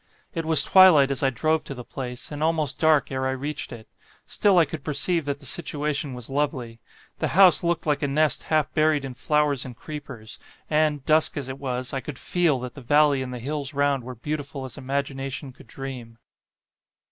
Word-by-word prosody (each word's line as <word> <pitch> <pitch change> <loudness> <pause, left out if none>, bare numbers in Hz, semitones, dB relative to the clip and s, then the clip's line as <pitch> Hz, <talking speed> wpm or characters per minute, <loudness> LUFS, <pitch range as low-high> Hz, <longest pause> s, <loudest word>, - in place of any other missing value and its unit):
It 165 -4 -3
was 160 -1 +5
twilight 165 -8 +7
as 135 - -1
I 135 - +3
drove 155 +5 0
to 140 - -6
the 125 - -8
place, 125 +1 -6
and 145 0 -6
almost 155 -4 0
dark 155 -3 +3
ere 130 0 -1
I 130 0 -2
reached 145 +3 -5
it; 115 -2 -10 0.4
still 200 -3 +2
I 170 - +6
could 150 0 -7
perceive 155 +3 0
that 140 0 -3
the 140 - -12
situation 150 -2 -2
was 125 -2 -7
lovely. 135 -5 -2 0.4
The - - 0
house 185 -4 +7
looked 170 0 0
like 150 -2 +1
a 145 - +1
nest 150 +2 +1
half 155 -2 0
buried 155 -2 +2
in 130 - -6
flowers 145 0 +1
and 125 -3 -9
creepers: 130 -8 -9 0.3
and, 150 -2 +1
dusk 155 0 +3
as 135 -2 -4
it 130 +1 -6
was, 130 -1 -3
I 135 - -1
could 135 +1 -7
FEEL 170 -5 +1
that 125 -1 -6
the 140 - -11
valley 145 +1 +3
and 130 -1 -5
the 125 - -5
hills 140 +3 -4
round 140 -2 +1
were 125 +1 -7
beautiful 140 +2 -5
as 130 - -8
imagination 135 0 -4
could - - -17
dream." 125 -4 -8
140 Hz, 205 wpm, -25 LUFS, 130-155 Hz, 0.4 s, twilight